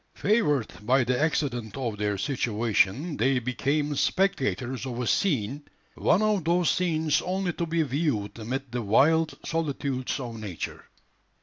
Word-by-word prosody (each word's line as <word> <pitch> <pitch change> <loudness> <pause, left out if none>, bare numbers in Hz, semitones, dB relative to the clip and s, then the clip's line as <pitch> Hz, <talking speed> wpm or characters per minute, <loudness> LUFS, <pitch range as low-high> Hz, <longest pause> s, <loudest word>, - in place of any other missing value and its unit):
Favoured 150 - +1
by 130 +4 +3
the 125 +2 0
accident 125 -8 -1
of 120 -5 -2
their 105 -1 0
situation, 120 - 0
they 130 +3 +2
became 140 +5 0
spectators 135 -8 0
of 120 -1 -4
a 125 - -1
scene 140 - 0 0.3
one 205 - +2
of 210 -4 +2
those 170 +1 +2
scenes 160 -4 +1
only 185 -1 -1
to 170 - -3
be 165 0 +1
viewed 130 -8 -1
amid 130 +3 -4
the 120 0 -2
wild 145 +8 +3
solitudes 140 -5 -2
of 120 -4 -6
Nature. 100 -6 -6
135 Hz, 140 wpm, -27 LUFS, 120-160 Hz, 0.3 s, by